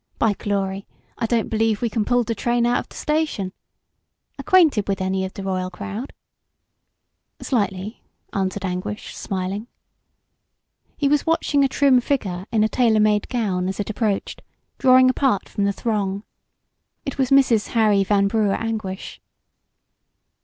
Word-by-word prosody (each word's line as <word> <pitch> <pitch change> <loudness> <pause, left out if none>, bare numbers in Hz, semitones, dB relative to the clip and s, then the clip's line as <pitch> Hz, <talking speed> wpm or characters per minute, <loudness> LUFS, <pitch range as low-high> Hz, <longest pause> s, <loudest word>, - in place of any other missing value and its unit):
By 220 -2 +2
glory, 195 -1 -3 0.3
I 230 - 0
don't 230 -1 +1
b'lieve 220 -1 +1
we 240 - 0
c'n 220 -1 -1
pull 245 0 +2
d' 230 0 -3
train 240 +2 +1
out 240 +1 +2
of - - -8
d' - - -15
station. 300 -12 -1 0.9
'Quainted 315 - +4
wid 195 - 0
any 190 0 -1
of 190 - -7
d' 195 - -6
royal 185 -1 -2
crowd?" 205 +7 -6 1.3
"Slightly," 205 -3 -2 0.3
answered 195 0 -2
Anguish, 185 +3 -4
smiling. 195 +2 -4 1.3
He 285 - +1
was 295 +2 +1
watching 295 -3 +2
a - - +4
trim 265 -2 +3
figure 195 -9 -2
in 215 -2 +3
a - - +3
tailor 225 -2 +2
made 210 -1 +2
gown 195 -7 -1
as 190 - -4
it 205 - -2
approached, 210 -2 -2 0.4
drawing 255 0 +6
apart 255 -5 +1
from 200 - -2
the 200 - +2
throng. 200 -2 -2 0.8
It 275 - -5
was 260 -2 +2
Mrs. 255 -6 +4
Harry 210 -3 +4
Van 200 0 +2
Brugh 210 -1 +1
Anguish. 215 -4 -5
215 Hz, 150 wpm, -22 LUFS, 195-245 Hz, 1.3 s, drawing